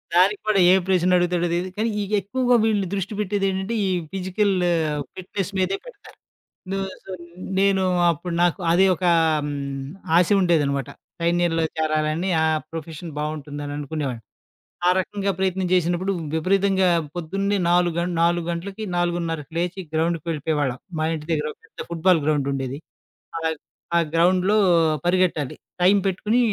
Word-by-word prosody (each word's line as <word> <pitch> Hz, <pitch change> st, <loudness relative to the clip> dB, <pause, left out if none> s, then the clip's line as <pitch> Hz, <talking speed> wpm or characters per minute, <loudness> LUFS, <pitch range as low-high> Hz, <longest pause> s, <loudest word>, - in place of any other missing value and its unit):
దానికి 195 Hz, +3 st, +4 dB
కూడా 210 Hz, -2 st, +3 dB
ఏ -, -, +7 dB
ప్రశ్న 180 Hz, -1 st, +3 dB
అడుగుతాడో 175 Hz, 0 st, +1 dB
తెలిదు. 180 Hz, +2 st, -1 dB
కానీ, 225 Hz, +2 st, +1 dB
ఈ -, -, 0 dB, 0.2 s
ఎక్కువగా 245 Hz, +5 st, +1 dB
వీళ్ళని 205 Hz, -4 st, +1 dB
దృష్టి 195 Hz, +1 st, -2 dB
పెట్టేది 205 Hz, -1 st, 0 dB
ఏంటంటే, 190 Hz, +4 st, -2 dB
ఈ -, -, 0 dB, 0.2 s
ఫిజికల్ 195 Hz, +2 st, 0 dB, 0.6 s
ఫిట్‌నెస్ 190 Hz, +1 st, -4 dB
మీదే 190 Hz, +1 st, +1 dB
పెడతారు. -, -, -14 dB, 0.5 s
న -, -, -1 dB, 0.3 s
సో, 190 Hz, -, -10 dB
న్ 175 Hz, +2 st, -11 dB
నేను 195 Hz, -1 st, +3 dB, 0.3 s
అప్పుడు 170 Hz, +2 st, -5 dB
నాకు 175 Hz, +1 st, +2 dB
అదే 185 Hz, +3 st, +5 dB
ఒకా 180 Hz, -1 st, +2 dB, 0.3 s
హ్మ్, 140 Hz, -2 st, -4 dB, 0.3 s
ఆశ 175 Hz, -, +4 dB
ఉండేదనమాట. 145 Hz, -7 st, +1 dB, 0.3 s
సైన్యంలో 170 Hz, -1 st, +1 dB
చేరాలని, 155 Hz, +3 st, 0 dB
ఆ -, -, +3 dB, 0.3 s
ప్రొఫెషన్ 165 Hz, 0 st, -7 dB
బాగుంటుందననుకునేవాడిని. 145 Hz, -3 st, -4 dB, 0.7 s
ఆ -, -, +6 dB
రకంగా 200 Hz, +1 st, -1 dB
ప్రయత్నం 190 Hz, -1 st, 0 dB
చేసినప్పుడు, 175 Hz, +2 st, +1 dB, 0.2 s
విపరీతంగా 190 Hz, +2 st, +2 dB, 0.3 s
పొద్దున్నే 195 Hz, +4 st, -1 dB
4 175 Hz, -1 st, +3 dB
గంట 175 Hz, +1 st, -1 dB
4 170 Hz, 0 st, +2 dB
గంటలకి 195 Hz, +5 st, -5 dB
4.30కి 170 Hz, -3 st, -2 dB
లేచి 180 Hz, +2 st, -2 dB
గ్రౌండ్‌‌కి 165 Hz, 0 st, 0 dB
వేళ్ళిపోయేవాళ్ళం. 150 Hz, -4 st, -1 dB, 0.2 s
మా 155 Hz, -, +1 dB
ఇంటి 155 Hz, 0 st, -8 dB
దగ్గర 150 Hz, -1 st, 0 dB, 0.2 s
పెద్ద -, -, -21 dB
ఫుట్‌ 165 Hz, -1 st, -6 dB
బాల్ 170 Hz, -4 st, +5 dB
గ్రౌండుండేది. 140 Hz, -2 st, -1 dB, 0.6 s
ఆగ్ 160 Hz, -2 st, -2 dB, 0.4 s
ఆ -, -, +5 dB, 0.2 s
గ్రౌండ్‌లో 185 Hz, +4 st, +3 dB, 0.5 s
పరిగెట్టాలి. 175 Hz, -6 st, +1 dB, 0.3 s
టైం 195 Hz, +3 st, +6 dB
పెట్టుకొని 210 Hz, +6 st, +1 dB
175 Hz, 140 wpm, -23 LUFS, 155-190 Hz, 0.7 s, ఏ